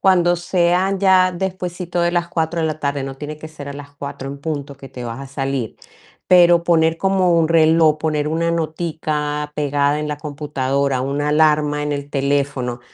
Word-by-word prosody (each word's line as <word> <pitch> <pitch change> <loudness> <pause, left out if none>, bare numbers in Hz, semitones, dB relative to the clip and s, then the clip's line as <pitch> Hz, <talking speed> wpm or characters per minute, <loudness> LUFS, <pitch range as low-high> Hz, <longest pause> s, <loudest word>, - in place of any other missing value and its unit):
Cuando 175 -2 +4
sean 180 +2 +1
ya 185 -1 +4
despuesito 180 -1 -3
de 170 0 +2
las 175 -1 0
4 165 0 -1
de 160 - +1
la 155 0 -4
tarde, 140 -1 -1
no 135 0 -6
tiene 150 +1 -6
que 155 - -8
ser 145 -2 -9
a - - -5
las 145 0 -10
4 140 -1 -7
en 140 0 -7
punto 145 -3 -4
que 135 0 -11
te 125 -1 -8
vas 115 +3 -6
a 135 - -7
salir, 135 -4 -3 0.5
pero 175 -1 +6
poner 165 -1 +3
como 185 -3 +2
un 160 - +3
reloj, 160 -1 +4
poner 150 -1 -1
una 165 +2 0
notica 155 -2 -2
pegada 145 0 +1
en 150 - -3
la 150 - -3
computadora, 140 -3 -1
una 145 +2 -1
alarma 150 -1 +2
en 150 - -2
el 140 0 -5
teléfono, 140 -3 -1
150 Hz, 190 wpm, -19 LUFS, 140-170 Hz, 0.5 s, pero